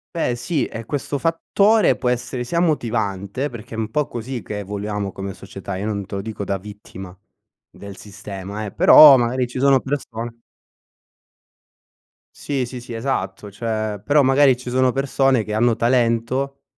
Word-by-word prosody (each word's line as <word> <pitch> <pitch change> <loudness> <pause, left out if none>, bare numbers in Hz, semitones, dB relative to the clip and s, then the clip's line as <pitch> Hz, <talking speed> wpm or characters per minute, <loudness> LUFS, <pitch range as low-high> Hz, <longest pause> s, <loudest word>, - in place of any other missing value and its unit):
Beh 125 -7 0
sì, 140 +5 -1
e 115 0 -7
questo 145 +1 -3
fattore 170 - +2
può 125 - -3
essere 125 0 -2
sia 170 +6 0
motivante, 120 - -1
perché 115 -1 -9
è - - -6
un 110 -1 -3
po' 150 +2 0
così 120 +1 -5
che 105 -1 -5
voliamo 105 0 -4
come 95 +1 -6
società, 100 0 -8
io 95 +3 -4
non 100 -2 -3
te 100 - -7
lo 100 - -3
dico 105 -1 -6
da 100 - -1
vittima 95 -2 -11 0.6
del 100 -1 -11
sistema 100 0 -8
eh, 100 - -6
però 145 -3 +9
magari 125 +1 0
ci 125 +1 -6
sono 135 -1 +4
persone 120 -4 -5 2.0
Sì 135 -3 -2
sì 120 0 -8
sì 120 -1 -9
esatto, 105 -5 -3
cioè 110 -1 -3
però 145 +6 +4
magari 135 -1 +4
ci 125 0 -8
sono 130 0 +2
persone 135 -3 +1
che 105 - -5
hanno 115 +1 +2
talento, 120 +3 0
120 Hz, 165 wpm, -21 LUFS, 105-135 Hz, 2.0 s, però